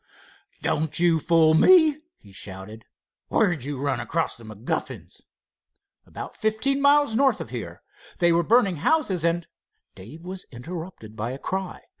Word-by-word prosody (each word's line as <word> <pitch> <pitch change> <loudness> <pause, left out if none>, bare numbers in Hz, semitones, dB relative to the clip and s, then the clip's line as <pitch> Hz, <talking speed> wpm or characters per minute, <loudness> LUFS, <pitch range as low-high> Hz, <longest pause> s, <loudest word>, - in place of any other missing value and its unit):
"Don't 155 0 0
you 170 -2 +3
fool 160 0 +4
me!" 315 - +6 0.2
he 100 - -18
shouted. 100 +3 -8 0.4
"Where 205 -5 +2
did 155 -8 -4
you 145 -2 -4
run 140 -3 -1
across 160 +7 -2
the 115 - -14
MacGuffins?" 110 +1 -5 0.9
"About - - -8
fifteen 220 +6 0
miles 285 -3 +4
north 270 +4 +3
of - - -7
here. - - -7 0.3
They 175 -1 +3
were 170 +1 +3
burning 200 -1 +3
houses, 190 - +1
and——" 170 0 0 0.5
Dave 150 - -12
was 185 0 -7
interrupted 150 - -8
by 115 +3 -4
a - - -6
cry. 190 +5 -4
170 Hz, 150 wpm, -24 LUFS, 130-210 Hz, 0.9 s, me